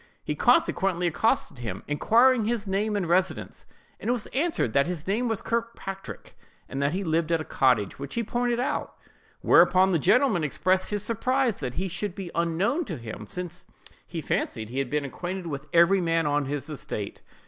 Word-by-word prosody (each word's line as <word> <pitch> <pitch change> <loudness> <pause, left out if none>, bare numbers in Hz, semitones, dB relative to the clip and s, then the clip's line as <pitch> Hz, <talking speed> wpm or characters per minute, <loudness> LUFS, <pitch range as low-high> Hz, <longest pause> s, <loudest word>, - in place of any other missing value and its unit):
He - - -2
consequently 180 -2 +2
accosted 175 - 0
him, 120 -2 -5
inquiring 230 - +4
his 225 -1 -1
name 205 +2 0
and 195 -4 -1
residence; 185 +2 0 0.3
and 235 - -1
was 240 -3 -1
answered 290 - 0
that 140 0 +3
his 175 -3 -4
name 220 +6 0
was 225 -3 -2
Kirkpatrick, 230 -4 -5 0.3
and 135 - -4
that 140 +2 +1
he 195 +2 -1
lived 165 -1 0
at 165 - +3
a - - -3
cottage, 125 -7 +1
which 140 0 -6
he 235 - 0
pointed 240 +2 0
out. 250 - -2 0.5
Whereupon 190 +1 +5
the 170 - +2
gentleman 215 - +3
expressed 185 +6 +1
his 205 -1 -2
surprise 245 +2 0
that 125 -3 -4
he 190 +2 -1
should 185 +1 -4
be 190 -4 -6
unknown 170 - +1
to 170 -7 -5
him, 110 -3 -8
since 180 0 -6 0.4
he 165 - -5
fancied 110 -6 -2
he 130 +3 -3
had 135 -2 -1
been 150 +1 -1
acquainted 180 +6 -5
with 150 -2 -5
every 170 +3 +5
man 165 -1 +1
on 145 0 +1
his 140 0 -4
estate. 120 -9 -5
180 Hz, 185 wpm, -26 LUFS, 150-215 Hz, 0.5 s, Whereupon